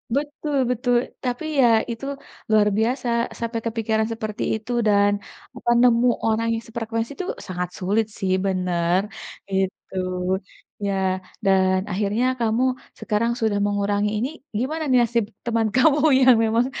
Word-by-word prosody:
Betul 295 0 -2
betul, 245 0 +1 0.3
tapi 250 +5 -2
ya 245 - +6 0.2
itu 230 +4 -6 0.4
luar 215 -1 +4
biasa 245 +3 0 0.3
sampai 230 0 -2
kepikiran 220 -1 0
seperti 215 -2 -4
itu, 220 +3 -6 0.2
dan 205 0 +4 0.4
apa, 240 - -3
nemu 245 0 +5 0.2
orang 225 +1 +1
yang 225 0 -3
sefrekuensi 225 +1 -3
tuh 370 - -4 0.2
sangat 180 -1 -3
sulit 205 +4 +1
sih 190 -2 0
bener, 180 -1 +1 0.5
gitu. 190 0 -2 0.9
Ya 200 - 0 0.5
dan 190 -1 +3
akhirnya 205 +5 0
kamu 230 +2 +1 0.4
sekarang 230 +2 0
sudah 210 -2 +1
mengurangi, 205 0 0
ini 250 +6 -1 0.3
gimana 310 +5 -2
nih 255 -1 +5
nasib 235 -1 +1 0.2
teman 230 -2 +1
kamu 285 +3 +5 0.2
yang 255 -2 +7
memang 230 +2 +2
225 Hz, 135 wpm, -23 LUFS, 205-245 Hz, 0.9 s, yang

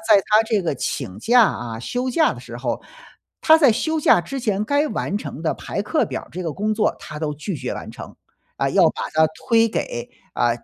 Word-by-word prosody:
在 220 -1 +5
他 215 +3 +3
这 215 -3 +1
个 165 -6 -1
请 110 -10 -4
假 240 +1 +5
啊， 120 - -1
休 250 - -2
假 315 +5 +2
的 - - -10
时 - - -9
候， - - -3 0.6
他 315 0 +7
在 285 -7 +5
休 315 +8 -1
假 180 - +5
之 275 +9 -6
前 210 -3 0
该 285 +6 +1
完 205 - -2
成 150 -6 -6
的 160 - -1
排 200 - -5
课 300 +9 +1
表 - - -4
儿 - - -16
这 185 - -5
个 160 -3 -3
工 215 +4 -1
作 215 -1 +1
他 150 - -8
都 150 -1 -2
拒 155 +4 -5
绝 130 -1 -4
完 - - -7
成。 - - -10 0.4
啊， - - 0
要 - - +5
把 - - -6
它 160 0 +4 0.2
推 230 -1 +5
给， 120 - -4 0.2
啊， 120 - +1
210 Hz, 245 characters per minute, -21 LUFS, 155-240 Hz, 0.6 s, 他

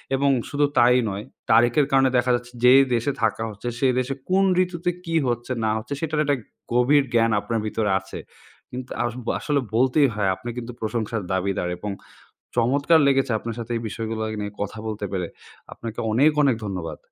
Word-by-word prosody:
এবং 140 +1 +2 0.2
শুধু 145 0 +2
তাই 125 +1 +6
নয়, 100 +2 -5 0.3
তারিখের 120 +5 +5
কারণে 135 -1 +4
দেখা 125 +1 +2
যাচ্ছে, 120 0 -6
যে 125 +1 +8 0.2
দেশে 120 +5 0
থাকা 110 0 +1
হচ্ছে, 105 +3 -8
সেই 130 -2 +3
দেশে 130 +2 -1 0.2
কোন 190 +1 +4 0.2
ঋতুতে 175 0 -3 0.2
কী 165 0 -2
হচ্ছে 120 +1 -2
না - - +2
হচ্ছে 110 +6 -5
সেটার 155 -1 0
একটা 140 -1 +1 0.4
গভীর 135 +4 +4
জ্ঞান 115 -1 +3
আপনার 115 +2 -2
ভিতরে 105 -1 -1
আছে। 95 - -9 0.5
কিন্তু 125 0 -6
আস 120 -1 -2 0.3
আসলে 145 -2 0 0.2
বলতেই 130 +4 +4
হয়, 100 -2 +1
"আপনি 120 - -8
কিন্তু 125 0 -5
প্রশংসার 110 0 -2
দাবিদার 95 -1 -1
এবং 105 +1 -4 0.7
চমৎকার 140 +7 +3
লেগেছে 135 -3 +2
আপনার 115 0 -6
সাথে 120 +1 -5
এই 115 - -3
বিষয়গুলা 110 +1 -4 0.2
নিয়ে 105 0 -4
কথা 105 +1 -5
বলতে 105 -1 -4
পেরে!" 90 -3 -2 0.4
আপনাকে 115 -1 -7
অনেক, 140 +7 +5
অনেক 135 -5 +3
ধন্যবাদ। 90 -4 -5
120 Hz, 180 wpm, -23 LUFS, 110-135 Hz, 0.7 s, যে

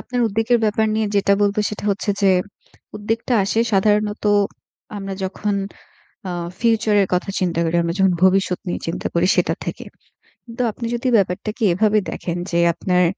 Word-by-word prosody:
আপনার 245 0 -3
উদ্বেগের 225 +3 +1
ব্যাপার 220 +1 +1
নিয়ে 220 0 0
যেটা 200 0 +3
বলবো, 205 0 +1
সেটা 210 -1 -7
হচ্ছে 200 +1 -1
যে 195 - +5 0.7
উদ্বেগটা 225 +4 -2
আসে 220 +3 0
সাধারণত 210 +2 +1 0.7
আমরা 195 -1 -5
যখন 205 +2 -2 0.7
আ - - -3 0.3
ফিউচারের 220 -3 +3
কথা 180 +2 -1
চিন্তা 175 -3 -1
করি, 165 +1 0
আমরা 170 0 -2
যখন 190 -1 +4
ভবিষ্যত 190 -1 +2
নিয়ে 175 - -3
চিন্তা 165 - -3
করি, 170 +1 +2
সেটা - - +2
থেকে। - - -5 0.6
কিন্তু 235 0 -6
আপনি 235 - -7
যদি 240 +2 -3
ব্যাপারটাকে 210 +4 -2
এভাবে 215 +3 +3
দেখেন 175 -1 -4
যে 170 - +1
আপনার 180 +1 +1
205 Hz, 160 wpm, -20 LUFS, 185-220 Hz, 0.7 s, যে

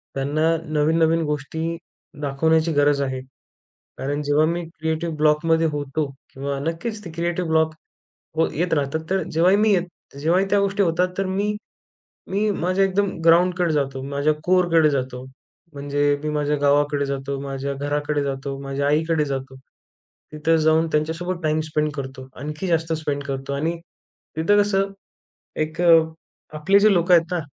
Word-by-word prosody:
त्यांना 155 +4 +1 0.2
नवीन-नवीन 160 +2 +3
गोष्टी 160 +3 -3 0.4
दाखवण्याची 160 +3 +1
गरज 145 -1 +3
आहे. 130 -2 -2 0.8
कारण 145 +2 -2
जेव्हा 145 +2 +3
मी 170 +2 -1 0.2
क्रिएटिव्ह 160 +1 -2
ब्लॉकमध्ये 160 +2 +3
होतो, 145 +1 -2 0.3
किंवा 140 +1 -3
नक्कीच 170 +9 -4
ती 170 - -7
क्रिएटिव 170 +2 -2
ब्लॉक 160 0 +2 0.7
व 165 - +4
येत 175 +3 -1
राहतात, 145 +1 -1
तर 190 0 +1
जेव्हाही 175 +5 +4
मी 215 -1 +4 0.4
जेव्हाही 170 +6 +2
त्या 205 - +4
गोष्टी 200 +1 +1
होतात 180 0 +2
तर 195 - 0
मी 200 +3 -1 0.8
मी 210 +2 +1
माझ्या 185 0 +1
एकदम 195 +1 +1 0.2
ग्राउंडकडे 175 0 +4
जातो, 135 -2 -1
माझ्या 140 +2 +1
कोअरकडे 175 -3 +4
जातो. 130 -2 -3 0.5
म्हणजे 145 0 -3 0.2
मी 155 - -1
माझ्या 150 0 0
गावाकडे 145 0 +2
जातो, 140 0 -3
माझ्या 140 0 -4
घराकडे 145 +1 -1
जातो, 135 0 -4
माझ्या 140 +1 -2
आईकडे 155 +1 +1
जातो. 135 -1 -5 0.8
तिथं 155 +2 +1
जाऊन 160 +1 +4
त्यांच्यासोबत 165 +4 -1
टाइम 155 0 +1
स्पेंड 150 0 0
करतो, 130 -2 -7
आणखी 150 +6 -5
जास्त 165 -1 0
स्पेंड 145 -3 -3
करतो. 135 0 -4
आणि 160 +5 -1 0.6
तिथं 205 +6 +4
कसं? 195 -1 0 0.6
एक 155 +2 -2 0.7
आपले 160 +7 +3
जे 210 0 +5
लोक 175 0 +1
आहेत 170 -2 +7
ना, 180 - 0
155 Hz, 145 wpm, -22 LUFS, 145-170 Hz, 0.8 s, आहेत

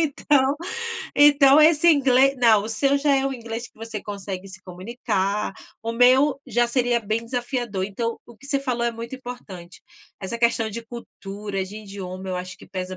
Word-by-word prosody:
então 285 -2 +2 0.6
então 290 0 +6
esse 310 +1 +5
inglês 275 -2 +4
não, 225 -4 +5
o 220 - -5
seu 275 +6 +1
já 285 0 +2
é 270 0 +1
o 275 - -2
inglês 235 -1 -6
que - - -35
você 225 -1 -7
consegue 195 -2 -6
se 190 0 -12
comunicar, 200 +1 -2 0.3
o 230 +1 -3
meu 260 +4 +4
já 240 0 +2
seria 245 0 +1
bem 220 +2 -2
desafiador. 240 -5 -3
Então 230 +4 -3
o 235 - -15
que 275 - -14
você 280 -1 0
falou 250 -3 -2
é 235 - +1
muito 230 +2 -7
importante. 220 -9 -10 0.4
Essa 205 +4 -5
questão 235 -1 +1
de 235 +3 -6
cultura, 205 -4 -6
de 195 +3 -10
idioma 190 -2 -8
eu 185 - -2
acho 180 0 -6
que - - -15
pesa 185 -1 -5
235 Hz, 185 wpm, -23 LUFS, 200-265 Hz, 0.6 s, então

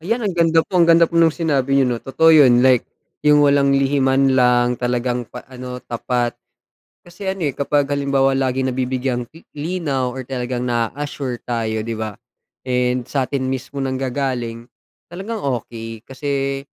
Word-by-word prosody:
Ayan, 225 +7 -2
ang 195 - 0
ganda 165 -1 +3
po, 180 -2 0
ang 170 - +4
ganda 170 0 +7
po 170 0 -1
nung 165 -1 +4
sinabi 140 -5 +1
niyo 135 - +4
'no. 120 - -3
Totoo 160 +4 +3
yun, 120 0 +4
like 130 -2 +4 0.4
yung 150 0 +5
walang 140 -1 +3
lihiman 135 -1 +2
lang, 125 -1 +3
talagang 125 -1 -1
pa 125 - -10
ano, 125 -1 -8
tapat. 120 0 -2 0.7
Kasi 175 +3 -12
ano, 180 -6 -2
eh, 135 - -5
kapag 140 0 +1
halimbawa 140 -1 +1
laging 130 0 0
nabibigyang 130 -1 -2
li 165 - -14 0.2
linaw 145 -5 -2
or 130 +1 -6
talagang 125 -1 -3
na-a-assure 125 +2 -3
tayo 110 -2 -1
'di 115 +1 -4
ba, 110 -1 -4 0.6
and 125 -1 0
sa'tin 135 -1 -1
mismo 135 +1 -4
nanggagaling, 130 -3 -3 0.4
talagang 200 +6 -6 0.2
okey. 115 -1 -9
Kasi 135 0 -3
135 Hz, 160 wpm, -20 LUFS, 125-145 Hz, 0.7 s, ganda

